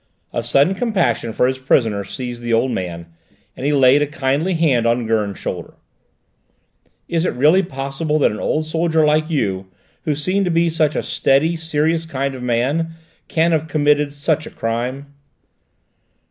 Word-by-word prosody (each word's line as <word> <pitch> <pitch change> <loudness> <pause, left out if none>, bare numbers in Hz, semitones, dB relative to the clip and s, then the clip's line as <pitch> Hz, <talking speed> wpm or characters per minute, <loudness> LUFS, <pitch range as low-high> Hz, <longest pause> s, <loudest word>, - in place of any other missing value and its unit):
A - - -1
sudden 145 +7 +3
compassion 195 - 0
for 120 - +1
his 130 +1 -1
prisoner 115 -6 +1
seized 120 +4 -6
the 120 -1 -2
old 120 +3 +2
man, 85 -4 -4 0.5
and 135 - -3
he - - +2
laid 135 0 +5
a 145 - +1
kindly 150 +4 -1
hand 135 -8 +2
on 120 0 +1
Gurn's 105 -3 -1
shoulder. - - -6 1.3
"Is 165 -1 0
it - - 0
really 150 +9 +4
possible 140 0 -2
that 150 - +3
an 105 - -6
old 155 +1 -1
soldier 160 0 +1
like 155 +1 +2
you, 95 - -1 0.4
who 150 - 0
seem 185 +7 0
to 180 - 0
be 170 0 +2
such 155 -2 +1
a - - -1
steady, 150 +5 +2
serious, 160 0 0
kind 140 -2 -2
of 130 - -8
man, 130 +7 0 0.3
can 165 +1 +2
have 160 -1 0
committed 150 -1 +2
such 150 +2 -1
a - - -7
crime?" 125 +5 -4
145 Hz, 170 wpm, -19 LUFS, 125-160 Hz, 1.3 s, laid